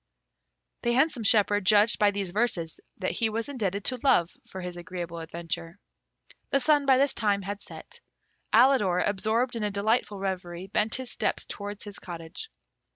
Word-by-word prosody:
The 240 - +1
handsome 265 0 +2
shepherd 205 -1 +3
judged 210 +3 +5
by 210 -2 +5
these 200 -3 -3
verses 185 -6 -1 0.2
that 185 - -2
he 225 -2 0
was 225 +1 -3
indebted 205 -7 -2
to 255 - 0
Love 175 -11 +3 0.2
for 190 - -7
his 180 -1 -6
agreeable 175 -1 -6
adventure. 165 +1 -5 0.7
The 275 - +3
sun, 290 +1 +3
by 265 -1 +6
this 275 +1 +3
time, 205 -2 0
had 200 +2 -5
set. - - -11 0.5
Alidor, 215 -7 +4
absorbed 220 +5 0
in 230 - -3
a 210 - +1
delightful 205 +1 0
reverie, 185 -2 -4
bent 215 +1 +2
his 260 -1 -4
steps - - -1
towards 205 0 -6
his 205 -1 -9
cottage. 170 - -8
205 Hz, 165 wpm, -27 LUFS, 185-235 Hz, 0.7 s, by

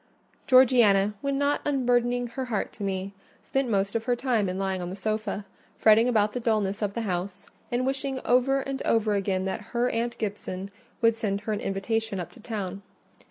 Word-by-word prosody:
Georgiana, 235 -6 +5
when 275 0 -1
not 285 +1 +1
unburdening 245 -3 +1
her 260 +2 -4
heart 225 -5 -2
to - - -12
me, 195 0 -3 0.3
spent 270 -2 -1
most 200 -1 0
of 225 0 -1
her 245 -1 +2
time 235 -6 0
in 185 - -3
lying 190 -1 -1
on 175 - -4
the 185 - -5
sofa, 215 -1 -2 0.3
fretting 225 +2 +5
about 215 -3 +2
the 250 - -2
dulness 215 -3 0
of 200 -1 -1
the 235 - -1
house, 185 -1 -3 0.2
and 245 +1 0
wishing 270 0 -1
over 265 +2 +3
and 270 0 -4
over 220 -2 +2
again 190 -2 0
that 190 +3 -3 0.2
her 245 +1 +2
aunt 235 +1 -2
Gibson 200 -2 -4 0.3
would 230 0 +6
send 205 -3 -2
her 215 +1 -2
an 205 - -2
invitation 205 +1 -2
up 175 - -5
to 255 - -16
town. 200 -4 -5
220 Hz, 195 wpm, -27 LUFS, 195-245 Hz, 0.3 s, would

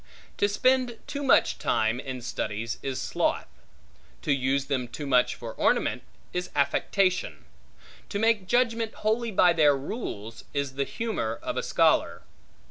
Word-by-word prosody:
To 205 - +2
spend 255 +2 +2
too 285 - -5
much 275 - +3
time 110 +2 +1
in 130 -2 -6
studies 115 -1 -3
is 135 -2 -3
sloth; - - 0 0.8
to 150 - 0
use 135 +1 0
them 130 -3 -1
too 135 +5 -7
much 125 -3 +3
for - - -7
ornament, - - +1 0.3
is 180 0 -2
affectation; 185 +6 +1 0.6
to 200 - -2
make 220 -3 +2
judgment 230 -1 +1
wholly 230 +2 +1
by 180 -4 +4
their 150 -4 +4
rules, 115 - -6
is 140 -2 -1
the 140 +1 -1
humor 210 - -3
of - - -3
a - - 0
scholar. - - +2
150 Hz, 145 wpm, -27 LUFS, -, 0.8 s, by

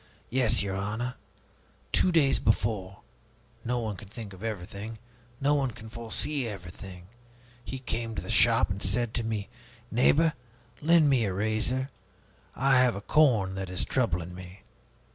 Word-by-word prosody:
Yes, 120 -6 +3
your 95 -1 -2
honor. 110 +6 -2 0.8
Two 185 - +4
days 150 -5 +4
before 100 -3 0 0.6
no 125 +1 -1
one 110 -4 -2
can 105 - -11
think 105 -1 -8
of 95 - -13
everything, 110 +1 -5 0.4
no 145 +2 +3
one 140 -3 +1
can 110 -1 -10
foresee 120 +4 -2
everything 90 -2 -8 0.6
he 130 - -5
came 115 -3 -3
to - - -2
the - - -5
shop - - +4
and 95 +1 -4
said 120 -2 +1
to 120 - -1
me, 110 -2 -2 0.4
'Neighbor, 150 +7 +4 0.5
lend 160 0 +5
me 130 -5 +3
a 95 - -1
razor; 110 +6 0 0.6
I 135 0 +4
have 125 -3 +4
a 100 - -5
corn 110 -7 +3
that 95 -1 -4
is 90 - -1
troubling 90 -9 0
me.' 90 +1 -10
110 Hz, 155 wpm, -28 LUFS, 100-130 Hz, 0.8 s, lend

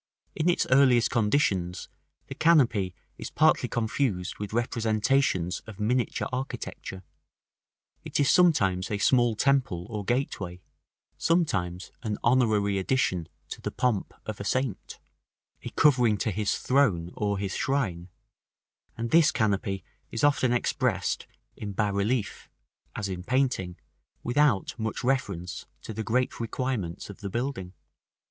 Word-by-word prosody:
In 160 +3 +1
its 175 - +2
earliest 130 -3 +5
conditions 105 -7 +1 0.4
the - - -7
canopy 125 - +3 0.2
is - - -5
partly - - +3
confused 110 -5 -1
with 105 -1 -5
representations 110 -5 +1
of 110 -2 -10
miniature 120 +4 0
architecture: 125 -7 -5 1.0
it - - -2
is 140 - +3
sometimes 100 - +3
a 105 - -1
small 120 +2 +3
temple 125 -9 +1
or 105 -2 -3
gateway, 100 -7 -2 0.6
sometimes 95 - 0
a 110 -3 -2
honorary 110 -5 +3
addition 95 -6 0 0.2
to - - -7
the - - -2
pomp 120 -6 -1
of 110 -1 -5
a - - -4
saint, 130 0 -2 0.6
a - - -6
covering 125 -7 +4
to 110 - -1
his 105 +1 0
throne, 105 -11 +2
or 100 -1 -1
to - - -4
his 95 -2 -3
shrine; 95 -11 -1 0.9
and 115 0 -3
this 165 -3 +6
canopy 100 -2 0 0.3
is 115 - -4
often 145 -4 +3
expressed 120 - 0 0.3
in 100 -2 -6
bas 105 0 0
relief 105 +2 -1 0.5
(as 105 - -2
in 90 -2 -5
painting), 120 -7 0 0.5
without 120 -5 +2
much 110 +2 -3
reference 100 -9 -2 0.2
to 110 - -6
the 110 +1 -4
great 125 +3 0
requirements 115 -6 -3
of 100 - -14
the 100 - -5
building. 115 -5 -3
110 Hz, 135 wpm, -27 LUFS, 95-130 Hz, 1.0 s, this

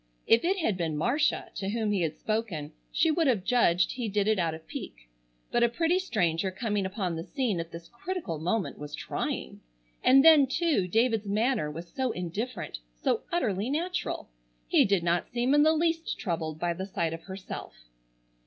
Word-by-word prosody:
If 225 +1 +5
it 380 +3 +2
had 220 - 0
been 160 -4 -1
Marcia 275 - +1
to 195 -1 -3
whom 220 0 0
he 200 -3 +1
had 160 -2 -1
spoken 210 -9 -2 0.2
she 325 - +3
would 325 0 +2
have 225 -8 +2
judged 185 -6 +3
he 245 -4 -3
did 205 0 +1
it 215 -2 +3
out 165 -2 0
of 160 - -13
pique, - - -8 0.4
but 240 - +2
a 235 - +5
pretty 330 +8 +1
stranger 190 - 0
coming 205 0 -1
upon 190 -3 -2
the 165 - -4
scene 240 - -1
at 165 0 -5
this 170 0 -9
critical 240 - -4
moment 180 +5 -1
was 150 0 -6
trying. - - -4 0.4
And 270 +3 +6
then, 305 -4 +8
too, 285 - +1
David's 225 +1 +1
manner 220 - +1
was 165 +3 -7
so 260 +8 -2
indifferent, 180 - -4 0.2
so - - 0
utterly 225 - 0
natural. 345 +6 -2 0.4
He - - +5
did 195 -3 +2
not 170 0 +1
seem 245 +3 +1
in 295 - +6
the 310 +1 +6
least 330 +1 0
troubled 160 -6 -3
by 170 +1 0
the 190 +3 -5
sight 170 -4 -1
of 165 - -6
herself. 190 0 -7
210 Hz, 190 wpm, -28 LUFS, 170-260 Hz, 0.4 s, then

